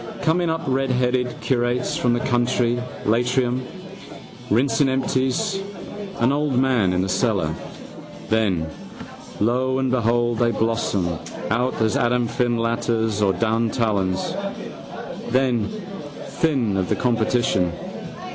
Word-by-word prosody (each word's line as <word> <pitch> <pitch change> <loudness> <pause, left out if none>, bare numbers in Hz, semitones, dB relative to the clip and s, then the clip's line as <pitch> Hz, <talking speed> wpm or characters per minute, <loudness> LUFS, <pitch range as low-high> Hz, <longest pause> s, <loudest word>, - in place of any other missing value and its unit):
Coming 170 +1 +2
up 160 0 -1
redheaded 125 -1 +1
curates 125 -1 0
from 120 -1 +2
the 120 - +1
county 120 -1 +1 0.2
Leitrim, 125 +3 +2 0.9
rinsing 135 +5 +3
empties 130 - 0 0.6
and 120 +4 +3
old 145 -3 +1
man 125 -7 +3
in 90 0 +1
the - - -1
cellar. 95 -5 +1 0.7
Then, 100 -7 +1 0.7
lo 125 +4 +2
and 130 -1 0
behold, 120 -1 +2
they 120 -1 +4
blossom 110 -5 0 0.4
out 125 +3 +1
as 110 -2 +2
Adam 120 0 +2
Findlaters 115 -2 0
or 100 -2 +4
Dan 115 +4 +1
Tallons. 100 -5 0 1.0
Then 125 -3 +2 0.6
think 130 -11 +1
of 90 -3 -1
the - - +2
competition. 115 -6 +1
120 Hz, 110 wpm, -22 LUFS, 110-130 Hz, 1.0 s, they